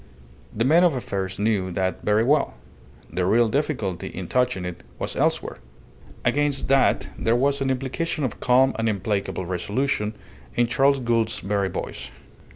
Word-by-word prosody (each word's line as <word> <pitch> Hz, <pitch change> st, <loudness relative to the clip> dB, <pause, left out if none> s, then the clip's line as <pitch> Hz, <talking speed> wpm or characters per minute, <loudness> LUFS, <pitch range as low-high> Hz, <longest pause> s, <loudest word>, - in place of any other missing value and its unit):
The 115 Hz, +2 st, -1 dB
men 165 Hz, +6 st, +5 dB
of 170 Hz, -5 st, +4 dB
affairs 95 Hz, -6 st, -3 dB
knew 100 Hz, -3 st, +1 dB
that 95 Hz, +1 st, -1 dB
very 105 Hz, +1 st, +2 dB
well. 145 Hz, +3 st, +2 dB, 0.6 s
The 90 Hz, -, 0 dB
real 115 Hz, +6 st, +4 dB
difficulty 120 Hz, -, -1 dB
in 90 Hz, -1 st, -6 dB
touching 125 Hz, -6 st, 0 dB
it 90 Hz, -1 st, -6 dB, 0.2 s
was -, -, -4 dB
elsewhere. -, -, 0 dB, 0.7 s
Against 145 Hz, -2 st, +1 dB
that 135 Hz, 0 st, +3 dB
there 115 Hz, +1 st, +2 dB
was 140 Hz, +3 st, +1 dB
an 135 Hz, -, +1 dB
implication 135 Hz, +5 st, -2 dB
of 130 Hz, -, -3 dB
calm 130 Hz, +2 st, +4 dB
and 115 Hz, 0 st, +1 dB
implacable 100 Hz, -2 st, -2 dB
resolution 105 Hz, +5 st, -1 dB, 0.4 s
in 120 Hz, -, +3 dB
Charles 135 Hz, +3 st, +3 dB
Gould's 115 Hz, -2 st, 0 dB
very 100 Hz, -1 st, 0 dB
voice. -, -, -5 dB
115 Hz, 155 wpm, -24 LUFS, 100-135 Hz, 0.7 s, men